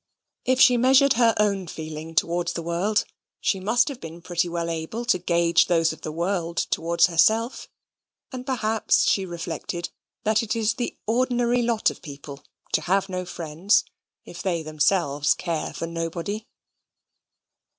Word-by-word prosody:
If 255 Hz, 0 st, +2 dB
she 250 Hz, -2 st, +7 dB
measured 265 Hz, +3 st, +5 dB
her 230 Hz, -1 st, +3 dB
own 200 Hz, -3 st, +1 dB
feeling 155 Hz, 0 st, -7 dB
towards 170 Hz, +1 st, +1 dB
the 170 Hz, -, -4 dB
world, 180 Hz, +6 st, 0 dB, 0.3 s
she 195 Hz, -, 0 dB
must 220 Hz, +5 st, +2 dB
have 280 Hz, -4 st, -6 dB
been 165 Hz, +1 st, -8 dB
pretty 175 Hz, 0 st, -1 dB
well 170 Hz, 0 st, -2 dB
able 165 Hz, +8 st, -4 dB
to 185 Hz, -, +2 dB
gauge 170 Hz, -1 st, +3 dB
those 165 Hz, -2 st, +2 dB
of -, -, -13 dB
the 155 Hz, -, -5 dB
world 170 Hz, +1 st, -2 dB
towards 170 Hz, +1 st, +2 dB
herself; 220 Hz, +8 st, +2 dB, 0.6 s
and 255 Hz, -1 st, -6 dB
perhaps 225 Hz, -5 st, +1 dB
she 195 Hz, -2 st, +2 dB
reflected 170 Hz, 0 st, -5 dB, 0.3 s
that 215 Hz, 0 st, +2 dB
it 225 Hz, 0 st, -2 dB
is 220 Hz, -1 st, +1 dB
the 245 Hz, -, -4 dB
ordinary 245 Hz, +1 st, +1 dB
lot 230 Hz, -2 st, +1 dB
of -, -, -13 dB
people 140 Hz, -2 st, -10 dB, 0.3 s
to -, -, +3 dB
have 195 Hz, +4 st, +1 dB
no 185 Hz, -1 st, -3 dB
friends 175 Hz, +4 st, +1 dB, 0.4 s
if 175 Hz, -, -9 dB
they 170 Hz, -4 st, -1 dB
themselves 155 Hz, -1 st, +1 dB
care 170 Hz, -3 st, -3 dB
for -, -, -5 dB
nobody. 170 Hz, +6 st, -4 dB
180 Hz, 155 wpm, -24 LUFS, 165-220 Hz, 0.6 s, she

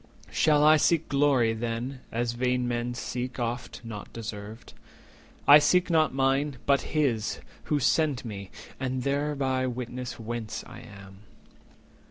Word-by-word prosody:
Shall 150 Hz, -2 st, +3 dB
I 155 Hz, +1 st, +7 dB
seek 165 Hz, +1 st, +2 dB
glory, 140 Hz, -5 st, +3 dB
then, 120 Hz, +3 st, -4 dB
as 120 Hz, +1 st, -1 dB
vain 125 Hz, +1 st, 0 dB
men 120 Hz, 0 st, -2 dB
seek, 125 Hz, +1 st, -4 dB
Oft 120 Hz, +1 st, -4 dB
not 110 Hz, -3 st, -8 dB
deserved? 110 Hz, 0 st, -8 dB, 0.7 s
I 145 Hz, +1 st, +10 dB
seek 180 Hz, +4 st, +3 dB
not 160 Hz, -1 st, +3 dB
mine, 135 Hz, +1 st, +1 dB
but 140 Hz, -1 st, +3 dB, 0.2 s
His 120 Hz, -8 st, 0 dB, 0.3 s
Who 150 Hz, -, +1 dB
sent 145 Hz, -2 st, +1 dB
me, 100 Hz, -4 st, -7 dB, 0.3 s
and 130 Hz, -1 st, -2 dB
thereby 140 Hz, -2 st, 0 dB
witness 125 Hz, 0 st, -5 dB
whence 115 Hz, -1 st, -5 dB
I -, -, -11 dB
am." 100 Hz, -1 st, -13 dB
125 Hz, 135 wpm, -27 LUFS, 115-140 Hz, 0.7 s, I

